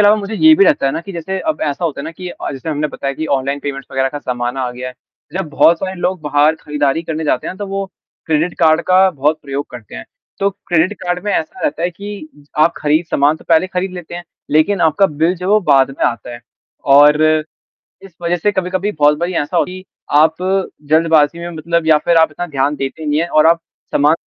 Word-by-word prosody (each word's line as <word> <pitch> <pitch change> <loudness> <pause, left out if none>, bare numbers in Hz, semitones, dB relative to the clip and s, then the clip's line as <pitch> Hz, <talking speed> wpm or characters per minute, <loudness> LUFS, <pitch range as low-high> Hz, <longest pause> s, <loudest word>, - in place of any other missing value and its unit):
अलावा 210 +1 +6
मुझे 205 +1 -5
ये 315 +7 +6
भी 395 - +6
रहता 295 - +3
है 135 - +1
ना - - -3
कि 195 +3 -9
जैसे 185 +3 -4
अब 315 -1 -2
ऐसा 145 +2 -2
होता 150 -4 -2
है 140 - -6
ना 160 - -5
कि 180 +2 -8
अ, - - -6
जैसे 135 +4 -7
हमने 150 0 -1
बताया 140 -1 -4
कि 160 - -4
ऑनलाइन 140 +1 0
पेमेंट्स 140 -1 -5
वगैरह 135 0 +1
का 145 +2 -6
ज़माना 125 +2 -3
आ 125 - -2
गया 125 +1 -6
है। 125 - -11 0.4
जब 190 -3 -3
बहुत 165 +3 +4
सारे 190 0 -4
लोग 185 -1 -1
बाहर 150 +1 +3
खरीदारी 150 +1 -1
करने 160 -1 -4
जाते - - 0
हैं, 185 - -5
तो 205 - -5
वो 195 0 -3 0.4
क्रेडिट 160 +2 0
कार्ड 160 -1 +4
का 190 +1 +6
बहुत 150 0 0
प्रयोग 140 0 -4
करते 120 -5 -11
हैं, - - -7 0.3
तो 200 0 +1
क्रेडिट 175 0 0
कार्ड 180 +1 -2
में 205 - 0
ऐसा 160 - -3
रहता 155 +3 -1
है 175 - 0
कि 200 -2 -8 0.3
आप 165 +2 +4
खरीद 155 +3 +1
सामान 145 +2 +2
तो - - -18
पहले 165 +2 +4
खरीद 185 0 -3
लेते 175 -1 -8
हैं 175 0 -7 0.3
लेकिन 155 +6 +2
आपका 165 +5 +3
बिल 160 +3 0
जब 180 +1 -6
वो 210 +1 +4
बाद 135 -1 +5
में 135 - -3
आता 120 0 -4
है 120 - -10 0.6
और 150 +1 +6 0.8
इस 195 -2 -13
वजह 170 +1 +1
से 205 +5 0
कभी-कभी 190 +2 -1
बहुत 150 -2 +3
बारी 175 +2 -2
ऐसा 150 +5 -3
होती 180 +2 0
है 185 - -10
कि - - -32 0.3
आप 160 +1 +4 0.5
जल्दबाज़ी 160 -1 +3
में 170 0 -6
मतलब 165 +1 -1
या 155 -1 +5
फिर 170 - +3
आप 160 -1 +5
इतना 175 +4 -5
ध्यान 145 -1 -1
देते 135 +3 -5
नहीं 150 +1 +1
है 170 - 0
और 155 -1 +4
आप 165 0 +4 0.3
समान 150 +2 +4
160 Hz, 240 wpm, -16 LUFS, 145-180 Hz, 0.8 s, अलावा